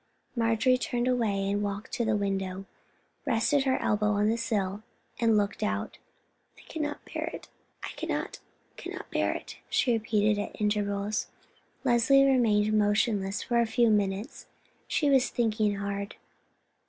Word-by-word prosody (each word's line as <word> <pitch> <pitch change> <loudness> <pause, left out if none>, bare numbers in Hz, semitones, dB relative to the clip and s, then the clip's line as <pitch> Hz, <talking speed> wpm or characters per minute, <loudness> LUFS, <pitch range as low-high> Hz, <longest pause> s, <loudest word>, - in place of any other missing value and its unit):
Marjorie 230 +2 +2
turned 245 0 -1
away, 205 -6 +1
walked 205 0 -3
to 235 - -1
the 220 -1 +1
window, 195 -1 -2 0.6
rested 275 +2 +2
her 260 -1 +2
elbow 210 0 +1
on 205 +1 +2
the 225 - +2
sill, 205 -4 -2 0.4
and 225 -2 +4
looked 205 -1 -1
out. 100 0 -2 0.6
"I - - -15
cannot, 295 -2 -3 1.8
cannot - - -8
bear - - +1
it," - - -8
she 245 - +2
repeated 215 -2 +1
at - - -7
intervals. 210 0 -1 0.6
Leslie 260 +2 +5
remained 220 -6 +3
motionless 205 -1 +1
for 240 -1 +1
a 230 - +1
few 230 +1 +3
minutes; 205 +4 -1 0.4
she 295 - +1
was 270 -3 +4
thinking 215 -3 +1
hard. 200 0 -4
215 Hz, 130 wpm, -28 LUFS, 205-240 Hz, 1.8 s, Leslie